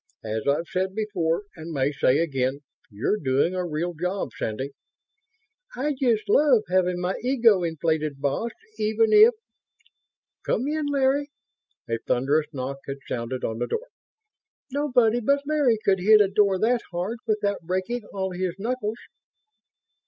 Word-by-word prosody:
As 110 Hz, +2 st, -3 dB
I've 145 Hz, +4 st, +2 dB
said 190 Hz, +1 st, -2 dB
before 200 Hz, -5 st, -1 dB
and 165 Hz, 0 st, -8 dB
may 140 Hz, -2 st, 0 dB
say 135 Hz, -1 st, +2 dB
again, 135 Hz, -4 st, -1 dB, 0.3 s
you're 110 Hz, -, -1 dB
doing 135 Hz, +5 st, +1 dB
a 185 Hz, -1 st, -1 dB
real 170 Hz, +1 st, -2 dB
job, 180 Hz, +1 st, -2 dB
Sandy." 130 Hz, +6 st, -3 dB, 1.0 s
"I 285 Hz, +4 st, -1 dB
just 240 Hz, -5 st, 0 dB
love 255 Hz, -1 st, +4 dB
having 180 Hz, -1 st, +2 dB
my 180 Hz, +1 st, -1 dB
ego 230 Hz, -6 st, +4 dB
inflated, 160 Hz, -3 st, -1 dB
boss, 140 Hz, +12 st, -1 dB, 0.3 s
even 220 Hz, +1 st, +2 dB
if... 435 Hz, +3 st, +8 dB, 1.1 s
Come 255 Hz, -, 0 dB
in, 305 Hz, 0 st, -1 dB
Larry!" 285 Hz, 0 st, +1 dB, 0.6 s
A 115 Hz, -1 st, -1 dB
thunderous 140 Hz, +7 st, +1 dB
knock 135 Hz, -1 st, -5 dB
had 140 Hz, 0 st, -4 dB
sounded 125 Hz, +1 st, -4 dB
on 110 Hz, 0 st, -2 dB
the 120 Hz, -, -1 dB
door. -, -, -4 dB, 0.8 s
"Nobody 250 Hz, -5 st, +2 dB
but 280 Hz, +4 st, +1 dB
Larry 290 Hz, -6 st, +2 dB
could 190 Hz, -1 st, +3 dB
hit 215 Hz, +4 st, +6 dB
a 205 Hz, -, +5 dB
door 200 Hz, -1 st, +3 dB
that 235 Hz, +4 st, +2 dB
hard 185 Hz, +7 st, -3 dB
without 210 Hz, -2 st, 0 dB
breaking 185 Hz, +8 st, -2 dB
all 190 Hz, -1 st, -3 dB
his 180 Hz, -1 st, -2 dB
knuckles!" 225 Hz, 0 st, -3 dB
185 Hz, 145 wpm, -25 LUFS, 150-235 Hz, 1.1 s, if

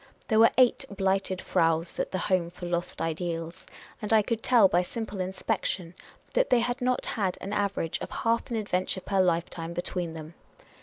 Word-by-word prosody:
There 220 Hz, -1 st, +4 dB
were 230 Hz, -, +8 dB
eight 255 Hz, 0 st, +4 dB
Blighted 195 Hz, -1 st, 0 dB
Fraus 165 Hz, -1 st, +1 dB
at -, -, 0 dB
the 185 Hz, -, -1 dB
Home 185 Hz, -2 st, +1 dB
for 175 Hz, 0 st, -9 dB
Lost 175 Hz, 0 st, -2 dB
Ideals, 165 Hz, +2 st, -3 dB, 0.3 s
and 210 Hz, -, -3 dB
I 220 Hz, -1 st, +5 dB
could 225 Hz, +1 st, -2 dB
tell 235 Hz, -5 st, +6 dB
by 180 Hz, -1 st, +3 dB
simple 215 Hz, +1 st, -5 dB
inspection 185 Hz, -2 st, -2 dB, 0.4 s
that -, -, +2 dB
they 245 Hz, -2 st, +4 dB
had 245 Hz, +2 st, -2 dB
not 250 Hz, 0 st, +1 dB
had 195 Hz, -5 st, -1 dB
an 200 Hz, +2 st, -5 dB
average 200 Hz, -5 st, -1 dB
of -, -, -5 dB
half 230 Hz, 0 st, 0 dB
an 235 Hz, -, -2 dB
adventure 190 Hz, -3 st, -1 dB
per 195 Hz, 0 st, +1 dB
lifetime 170 Hz, -1 st, -1 dB
between 175 Hz, -1 st, -3 dB
them. 160 Hz, +1 st, -8 dB
190 Hz, 185 wpm, -28 LUFS, 170-220 Hz, 0.4 s, were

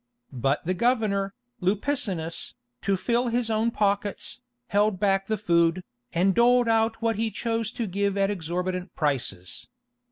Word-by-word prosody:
But 135 Hz, +4 st, 0 dB
the 185 Hz, -, +1 dB
governor, 200 Hz, -2 st, +1 dB, 0.3 s
Lupicinus, 190 Hz, -, -1 dB, 0.3 s
to 195 Hz, -1 st, +1 dB
fill 240 Hz, +6 st, +1 dB
his 235 Hz, -1 st, 0 dB
own 220 Hz, +1 st, +2 dB
pockets, 205 Hz, -2 st, -1 dB, 0.3 s
held 205 Hz, -1 st, +2 dB
back 195 Hz, -1 st, +2 dB
the 220 Hz, -, 0 dB
food, 170 Hz, -2 st, +2 dB, 0.3 s
and 185 Hz, +3 st, +3 dB
doled 240 Hz, +2 st, +4 dB
out 225 Hz, 0 st, +2 dB
what 225 Hz, -2 st, +1 dB
he 225 Hz, +1 st, 0 dB
chose 225 Hz, 0 st, -2 dB
to 235 Hz, -, -2 dB
give 200 Hz, +1 st, -1 dB
at 195 Hz, 0 st, +2 dB
exorbitant 180 Hz, 0 st, -3 dB
prices. 125 Hz, -, -2 dB
200 Hz, 140 wpm, -26 LUFS, 180-225 Hz, 0.3 s, doled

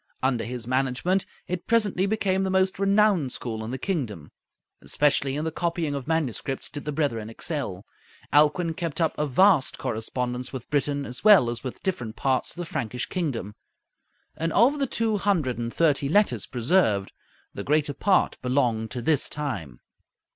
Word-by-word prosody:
Under 130 Hz, -3 st, +1 dB
his 120 Hz, -1 st, -5 dB
management, 135 Hz, +9 st, 0 dB, 0.2 s
it 180 Hz, -1 st, -4 dB
presently 205 Hz, -4 st, +2 dB
became 195 Hz, -2 st, +1 dB
the 190 Hz, -, -1 dB
most 190 Hz, +1 st, +1 dB
renowned 195 Hz, -7 st, +3 dB
school 110 Hz, -2 st, -4 dB
in 110 Hz, -, -5 dB
the 130 Hz, -, -3 dB
kingdom. 125 Hz, -, -3 dB, 0.5 s
Especially 140 Hz, -2 st, +1 dB
in 150 Hz, +2 st, -2 dB
the 160 Hz, -, -1 dB
copying 170 Hz, -2 st, -2 dB
of 140 Hz, -1 st, -5 dB
manuscripts 145 Hz, -4 st, -1 dB
did 145 Hz, -1 st, -7 dB
the 150 Hz, -, -2 dB
brethren 140 Hz, -8 st, -1 dB
excel. 115 Hz, -, -4 dB, 0.5 s
Alcuin 155 Hz, +3 st, +4 dB
kept 170 Hz, -2 st, -3 dB
up 165 Hz, -2 st, +2 dB
a 150 Hz, -, -1 dB
vast 165 Hz, 0 st, +4 dB
correspondence 125 Hz, +3 st, -3 dB
with 130 Hz, -1 st, -8 dB
Britain 145 Hz, -1 st, 0 dB
as 125 Hz, -, -7 dB
well 195 Hz, -, +7 dB
as 120 Hz, -, -6 dB
with 130 Hz, -, -7 dB
different 125 Hz, -, -3 dB
parts 130 Hz, -1 st, 0 dB
of -, -, -9 dB
the 175 Hz, -, -4 dB
Frankish 125 Hz, -, -3 dB
kingdom; 135 Hz, -, -3 dB, 0.8 s
and 165 Hz, +1 st, -2 dB
of 265 Hz, +8 st, +4 dB
the 275 Hz, -, +1 dB
two 225 Hz, -3 st, 0 dB
hundred 170 Hz, -12 st, 0 dB
and 120 Hz, 0 st, -3 dB
thirty 145 Hz, -3 st, +2 dB
letters 205 Hz, +6 st, +2 dB
preserved, 120 Hz, -, +1 dB, 0.4 s
the 100 Hz, -, -5 dB
greater 150 Hz, +2 st, +1 dB
part 195 Hz, +4 st, +1 dB
belonged 125 Hz, -4 st, 0 dB
to 120 Hz, +2 st, -5 dB
this 150 Hz, +1 st, +2 dB
time. 95 Hz, -, -5 dB
145 Hz, 170 wpm, -25 LUFS, 125-180 Hz, 0.8 s, well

